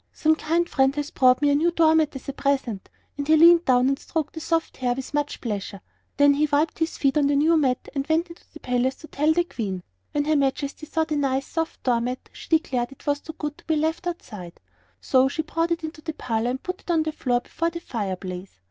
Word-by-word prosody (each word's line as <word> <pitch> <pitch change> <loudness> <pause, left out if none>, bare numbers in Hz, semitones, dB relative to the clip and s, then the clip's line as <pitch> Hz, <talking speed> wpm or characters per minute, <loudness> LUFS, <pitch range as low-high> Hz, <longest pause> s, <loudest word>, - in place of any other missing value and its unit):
some 315 0 +2
kind 335 +2 0
friend 270 -2 +2
has 295 +1 -3
brought 255 +2 +4
me 290 - +4
a - - +4
new 315 +4 +3
door 330 -2 +4
mat 315 -3 +2
as 270 - -8
a 275 - -3
present," 265 -8 -1 0.3
and 285 - -2
he 315 0 +6
leaned 340 +1 +7
down 250 0 +4
and 275 0 +1
stroked 315 -2 -3
the 320 - -6
soft 325 +1 -1
hair 245 -1 0
with 265 +2 -7
much 290 0 -1
pleasure. 205 -3 -4 0.4
Then 285 0 +6
he 300 +2 +2
wiped 300 +3 +1
his 325 0 -1
feet 275 +1 +2
on 285 - +3
the 285 - +2
new 310 +4 +4
mat 265 -5 +1
and 275 0 -2
went 325 +2 +1
into 335 - -13
the 315 - -12
palace 250 +1 0
to 315 - -13
tell 300 +1 +1
the 345 +2 +3
Queen. 195 - -5 0.3
When 290 0 0
her 310 +1 +2
Majesty 280 +2 -1
saw 320 +1 0
the 310 -1 -2
nice, 270 -1 0
soft 325 -1 -4
door 240 -2 +2
mat 250 +2 -4
she - - -12
declared 275 -7 +1
it 275 - -16
was 290 -1 +1
too 320 - -8
good 300 +1 -5
to - - -20
be 320 - +1
left 320 +3 -1
outside; 210 - -7 0.4
so 260 - +3
she 315 +4 -2
brought 330 +2 -1
it 335 -1 -1
into 315 0 -6
the 315 0 -4
parlor 230 -4 -1
and 260 +1 -4
put 365 0 -5
it - - -20
on 325 -2 +3
the 315 - -2
floor 245 -5 0
before 335 +6 -2
the 335 0 -6
fire 210 - -3
place. 185 - -8
290 Hz, 255 wpm, -24 LUFS, 255-320 Hz, 0.4 s, leaned